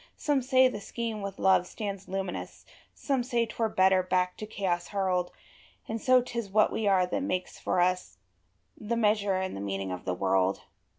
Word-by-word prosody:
Some 290 -3 +1
say 260 0 +5
the 250 - -4
Scheme 230 -1 -4
with 200 -1 -5
love 190 -2 +3
stands 200 -2 -5
luminous, 190 -1 -5 0.3
Some 270 -3 0
say 240 -1 0
't - - -10
were 225 -1 +2
better 190 -1 +4
back 180 0 0
to 215 - -6
chaos 185 -5 -2
hurled; 185 -3 0 0.6
And 225 0 -4
so 255 -1 +5
't 240 -1 -4
is 215 -4 -5
what 215 +2 +3
we 220 - -1
are 190 -2 +4
that 180 - -2
makes 185 -10 -3
for - - 0
us 180 +1 0 0.6
The 225 +2 -3
measure 210 -3 +2
and 185 0 -2
the 100 - -5
meaning 95 -1 -3
of 90 0 -6
the 90 - -1
world. 95 0 +1
195 Hz, 195 wpm, -29 LUFS, 180-225 Hz, 0.6 s, say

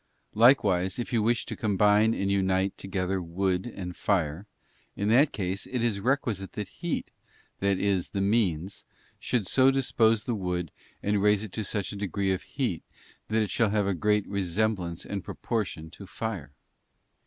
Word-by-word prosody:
Likewise, 100 -6 +4
if 120 0 -4
you 115 - +3
wish 115 +2 +1
to - - -5
combine 105 +1 +3
and 100 0 0
unite 95 0 +1
_ - - -47
together 95 -1 -2
wood 90 +3 -1
and 90 -6 -6
fire, 90 -1 0 0.5
in 100 +1 -1
that 135 +6 +5
case, 95 0 -3
it 125 -2 -2
is 110 -4 +1
requisite 115 -5 -1
that 105 -2 -4
heat, 170 - -4 0.5
that 100 -1 +2
is 95 -3 0
the 100 - -3
means, 100 -4 0 0.4
should 115 -5 0
so 130 +7 +4
dispose 115 -5 +2
the 120 - -2
wood, 90 -5 -2 0.3
and 105 0 +1
raise 105 0 +3
it 110 - -7
to 110 - -3
such 100 0 -3
a - - -6
degree 100 -1 -1
of 95 - -1
heat - - -3 0.4
that 110 0 +2
it 105 - -4
shall 115 -3 +2
have 105 -1 +1
a 100 - +1
great 105 +3 +1
resemblance 95 -2 -1
and 100 -3 -4
proportion 90 -8 -3
to 100 +2 -11
fire. 95 -10 -5
100 Hz, 175 wpm, -28 LUFS, 95-110 Hz, 0.5 s, that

